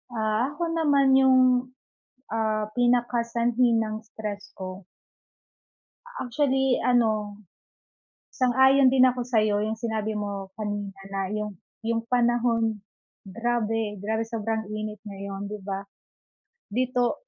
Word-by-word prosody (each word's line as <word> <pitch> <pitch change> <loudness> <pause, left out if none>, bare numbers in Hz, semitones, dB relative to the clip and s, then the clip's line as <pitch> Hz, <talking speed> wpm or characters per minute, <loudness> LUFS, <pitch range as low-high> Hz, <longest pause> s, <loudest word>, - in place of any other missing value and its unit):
Ah, 220 +6 0
ako 345 - -3
naman 290 -4 +3
yung, 260 -1 +6 0.9
ah, 215 -1 -1
pinakasanhi 240 -1 +2
ng 215 0 -3
stress 210 -2 -7
ko 185 +1 -6 1.2
actually 270 - 0
ano, 215 -4 +1 1.0
sang-ayon 265 +1 +5
din 255 -1 +6
ako 250 -1 -2
sa'yo. 215 -4 +2
Yung 220 +1 -2
sinabi 220 -2 -2
mo 200 -2 -4
kanina 205 -2 -3 0.2
na 195 - -1
yung 210 -2 -3 0.3
yung 230 0 0
panahon, 235 -3 +2 0.5
grabe 225 0 -1
grabe 220 +2 -1
sobrang 220 -1 -3
init 215 -1 -4
ngayon, 200 0 -6
di 210 - -5
ba? 195 0 -4 0.9
Dito, 250 - 0
225 Hz, 110 wpm, -26 LUFS, 210-245 Hz, 1.2 s, yung